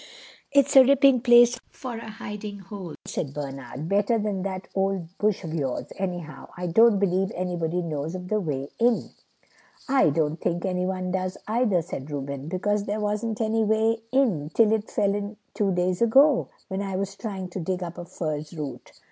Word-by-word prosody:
"It's 280 -1 +3
a 265 - +11
ripping 275 -1 +5
place 240 -1 +6
for 255 -2 -7
a 225 - -8
hidey 210 -2 -7
hole," 195 -3 -8
said 140 -2 -4
Bernard, 135 0 -6
"better 205 +4 +2
than 205 -3 -1
that 190 0 -4
old 190 -3 -1
bush 210 -2 +1
of 160 -2 -5
yours, 135 -6 -2
anyhow. 175 -7 -5
I 180 - -4
don't 220 +5 +5
believe 190 -1 +1
anybody 175 -1 -1
knows 155 +1 -3
of 180 0 -6
the 215 +2 +1
way 140 -6 -3
in." 235 0 +2 0.8
"I 270 - +4
don't 155 +2 0
think 175 +1 -1
anyone 185 0 -1
does, 185 0 -2
either," 215 -6 +2
said 150 -4 -6
Reuben, 140 -1 -5
"because 200 +4 0
there 210 +1 -2
wasn't 210 +2 -2
any 220 0 +2
way 220 +1 +2
in 220 - +2
till 220 -2 +5
it 220 -1 -1
fell 200 -1 +1
in 205 +1 -4 0.2
two 200 -2 +1
days 180 +1 0
ago, 265 +4 +5 0.2
when 190 0 -3
I 195 -1 -3
was 195 +1 -3
trying 195 -3 -5
to 180 - -5
dig 180 +2 -2
up 170 -1 -7
a 175 - -6
furze 155 -1 -4
root." 145 -3 -6
190 Hz, 180 wpm, -25 LUFS, 170-220 Hz, 0.8 s, a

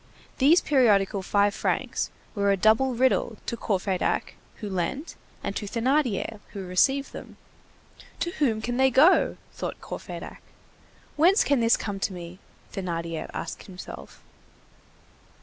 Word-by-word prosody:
These 305 +7 +6
periodical 205 -8 +3
five 200 +1 +2
francs - - -1 0.2
were 200 -2 +1
a 195 - +2
double 220 +6 +3
riddle 240 -2 +2
to - - -2
Courfeyrac 190 -4 -1 0.2
who 215 - -7
lent 195 - -3 0.3
and 200 - -3
to 205 - -3
Thénardier 235 -2 0
who 195 -2 -5
received 270 +10 +2
them. - - -10 0.8
"To 345 - 0
whom 225 -7 +1
can 245 +1 -2
they 265 0 +5
go?" 295 +9 +5 0.2
thought - - -5
Courfeyrac. - - -8 0.8
"Whence 360 +7 +5
can 280 -3 +2
this 230 0 +4
come 200 -2 -4
to 195 - -1
me?" 175 +1 -9 0.3
Thénardier 170 -3 -4
asked 165 - -6
himself. 70 - -10
215 Hz, 130 wpm, -26 LUFS, 190-265 Hz, 0.8 s, These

